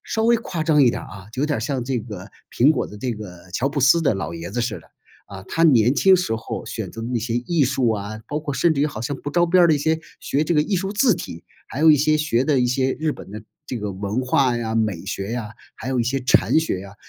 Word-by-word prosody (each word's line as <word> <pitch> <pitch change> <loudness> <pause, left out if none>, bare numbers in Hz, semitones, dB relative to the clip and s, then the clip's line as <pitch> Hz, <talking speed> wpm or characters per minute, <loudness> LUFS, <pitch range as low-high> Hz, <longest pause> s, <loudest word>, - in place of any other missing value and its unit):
稍 220 0 -1
微 235 +1 +5
夸 180 -8 -4
张 155 -3 +4
一 130 - +6
点 - - -5
儿 - - -10
啊， 95 0 -11
就 130 - -2
有 - - +2
点 150 - 0
儿 - - -4
像 135 +1 -2
这 130 0 -1
个 105 -4 -8 0.2
苹 130 +5 +4
果 155 - 0
的 105 - -11
这 125 +3 -3
个 95 -4 -10
乔 125 +8 0
布 145 +1 -4
斯 135 +6 +5
的 140 -7 +2
老 95 -4 -4
爷 85 +1 -7
子 120 +3 -2
似 115 -2 -3
的。 - - -23 0.4
啊， 95 -1 -9
他 165 - +1
年 125 -6 +5
轻 190 +6 +5
时 180 -11 0
候 110 - -6
选 - - -5
择 115 - -8
那 120 +1 -2
些 115 +1 -3
艺 145 +6 +1
术 130 -2 +1
啊， 110 0 -4
包 150 - -2
括 150 -2 -4
甚 170 +3 +3
至 140 - -1
于 145 - +3
好 140 -8 -6
像 125 +5 -3
不 140 - -6
着 175 +4 +2
边 175 +1 +4
儿 - - +7
的 160 - +4
一 - - 0
些， 160 +2 +1 0.2
学 145 +3 0
这 170 - 0
个 150 - +4
艺 195 +4 -1
术 195 +2 -2
字 230 +2 +3
体， 85 - -8 0.2
还 135 - -6
有 160 0 +7
一 150 - +6
些 155 +2 +2
学 140 -5 +1
的 145 -3 +2
一 125 - +2
些 130 +1 +1
日 155 +3 -2
本 - - -8
的 110 +1 -7 0.2
这 130 - -4
个 105 -3 -4
文 100 +5 -3
化 130 -1 +2
呀、 115 -1 -2
美 105 -7 -1
学 100 +2 -4
呀， 120 -3 -4 0.3
还 - - -7
有 130 -1 0
一 120 - +1
些 135 +3 -1
禅 130 +5 +3
学 160 - -2
啊， 100 0 -12
130 Hz, 315 characters per minute, -22 LUFS, 110-155 Hz, 0.4 s, 儿